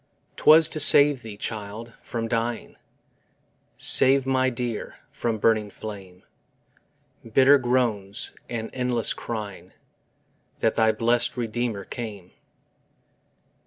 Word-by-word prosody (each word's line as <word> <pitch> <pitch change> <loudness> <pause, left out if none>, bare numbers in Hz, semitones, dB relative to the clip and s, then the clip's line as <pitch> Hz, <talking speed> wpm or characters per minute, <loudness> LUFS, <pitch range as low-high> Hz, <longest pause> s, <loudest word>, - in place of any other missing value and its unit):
'Twas 160 +1 +6
to 155 - -2
save 145 -2 +6
thee, 110 -3 -10
child, 110 +2 -6
from 115 -1 -5
dying, 115 0 -3 1.0
Save 135 0 +4
my 130 -1 +1
dear 120 -3 -5 0.2
from 115 -2 -3
burning 110 -1 +1
flame, 95 -4 -10 1.1
Bitter 135 +3 +6
groans 120 -6 -1 0.2
and 115 -2 -5
endless 125 -3 -1
crying, 100 -6 -7 0.8
That 115 - 0
thy 110 -1 +3
blest 115 +3 0
Redeemer 115 -3 -3
came. 105 -7 -8
115 Hz, 100 wpm, -24 LUFS, 105-125 Hz, 1.1 s, Twas